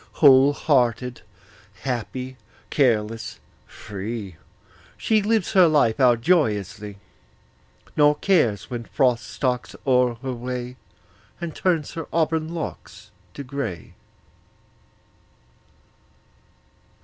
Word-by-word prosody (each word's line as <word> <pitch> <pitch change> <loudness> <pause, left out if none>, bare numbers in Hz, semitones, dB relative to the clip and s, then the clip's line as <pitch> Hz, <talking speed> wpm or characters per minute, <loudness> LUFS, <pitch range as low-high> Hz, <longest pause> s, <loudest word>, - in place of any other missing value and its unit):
Whole 140 -1 +6
hearted, 125 -4 +1 0.6
happy, 130 +1 -4 0.4
careless, 115 -5 0 0.3
free, 100 -1 -7 0.6
She 220 -1 +2
lives 215 -1 0
her 185 -3 +7
life 145 -8 +2
out 120 -3 +4
joyously, 105 - 0 1.0
Nor 150 0 +5
cares 135 - +1
when 120 -1 -4
Frost 125 -3 +1
stalks 125 -3 -2
o'er 125 -2 +3
her 130 -1 -2
way 125 +1 -5 0.6
And 170 -3 -5
turns 170 -6 0
her 165 -2 -6
auburn 160 -1 0
locks 105 - -7 0.2
to 140 - -6
gray. 125 - -5
125 Hz, 90 wpm, -23 LUFS, 115-150 Hz, 1.0 s, her